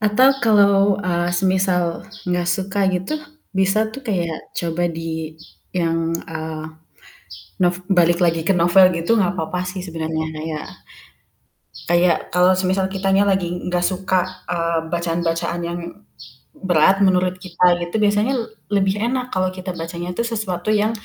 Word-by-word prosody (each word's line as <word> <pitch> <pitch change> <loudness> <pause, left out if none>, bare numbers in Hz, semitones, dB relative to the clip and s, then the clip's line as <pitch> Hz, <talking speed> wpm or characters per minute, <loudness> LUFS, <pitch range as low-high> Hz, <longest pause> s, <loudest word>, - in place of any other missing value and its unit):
Atau 215 +5 +4
kalau, 200 -2 +4
eee, 175 -1 0
semisal 185 -1 +2 0.5
gak 175 -1 0
suka 190 +3 -1
gitu 185 +9 -2 0.4
bisa 195 +2 +2
tuh 270 - -8
kayak 170 -6 -3
coba 170 0 -2
di 160 -1 -5 0.4
yang, 165 -1 0
eee, 160 -1 -6 1.0
nov 175 0 +3 0.2
balik 175 -2 +4
lagi 165 -1 +2
ke 195 - +4
novel 175 +2 +6
gitu, 170 +7 +1
gak 190 0 +1
apa-apa 180 +1 -3
sih 185 0 -5
sebenarnya 160 -2 -3
kayak 155 -1 -5 1.3
kayak 175 0 +4 0.2
kalau 180 +1 +4
semisal 190 +1 +1
kitanya 195 0 +1
lagi 190 -2 +1 0.2
gak 175 0 0
suka, 185 0 +1 0.3
eee, 170 -1 0
bacaan-bacaan 170 0 -1
yang 175 - -4 0.7
berat 190 - +3
menurut 185 -1 +3
kita 180 0 0 0.2
gitu, 175 +2 -5
biasanya 210 +5 +2
l - - -2 0.3
lebih 195 -1 +2
enak 250 0 -1
kalau 185 0 +1
kita 185 0 -5
bacanya 170 +1 -6
tuh - - +1
sesuatu 210 -5 -3
yang 215 +1 +2
180 Hz, 140 wpm, -20 LUFS, 170-195 Hz, 1.3 s, novel